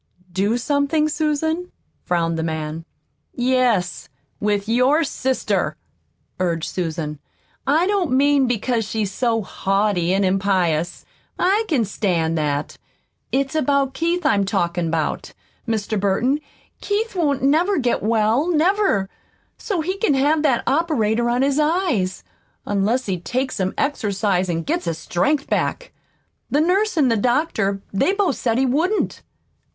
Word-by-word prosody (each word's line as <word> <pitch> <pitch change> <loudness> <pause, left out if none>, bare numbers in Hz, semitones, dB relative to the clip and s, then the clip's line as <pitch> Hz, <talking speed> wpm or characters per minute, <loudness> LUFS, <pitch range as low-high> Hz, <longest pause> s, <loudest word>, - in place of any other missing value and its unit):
"Do 200 +6 +1
something, 285 +4 +1
Susan?" 315 +3 -1 0.3
frowned 165 -1 0
the 165 - -2
man. 160 0 -4 0.5
"Yes, 245 -7 +1 0.3
with 205 -1 0
your 255 +7 +3
sister," 265 -3 -1 0.6
urged 170 -3 -1
Susan. 160 -4 -3 0.5
"I 310 +5 +3
don't 385 -6 0
mean 275 0 +3
because 240 0 0
she's 210 -2 -2
so 225 0 0
haughty 195 -2 0
an' 195 +1 +2
impious. 185 -3 0 0.3
I 400 +5 +2
can 270 - +1
stand 175 -5 0
that. 150 -2 -2 0.5
It's 270 0 0
about 280 -3 +1
Keith 340 +5 -1
I'm 200 -1 +3
talkin' 175 -4 -1
about. 160 -1 -2 0.3
Mr. 220 -1 -1
Burton, 230 +9 +1 0.4
Keith 430 +3 -1
won't 285 -7 0
never 330 +8 +3
get 245 -4 0
well, 225 - +2
never, 345 - +2 0.5
so's 355 -7 -2
he 375 +2 -2
can 350 -11 +2
have 295 +3 +2
that 270 -6 +2
operator 240 -7 +1
on 245 +2 +1
his 280 +1 +1
eyes, 300 - 0 0.4
unless 205 +6 0
he 185 -3 -2
takes 255 +8 -2
some 190 -1 -1
exercise 200 -8 0
an' 165 -1 -1
gets - - -2
his 165 -2 -2
strength 270 - 0
back. - - -2 0.6
The 290 - +2
nurse 370 +5 +1
an' 280 -5 +4
the 230 - +2
doctor 220 -5 0
they 275 - +2
both 395 -8 0
said 230 -2 0
he 265 - +3
wouldn't." 330 +11 0
240 Hz, 135 wpm, -21 LUFS, 195-300 Hz, 0.6 s, an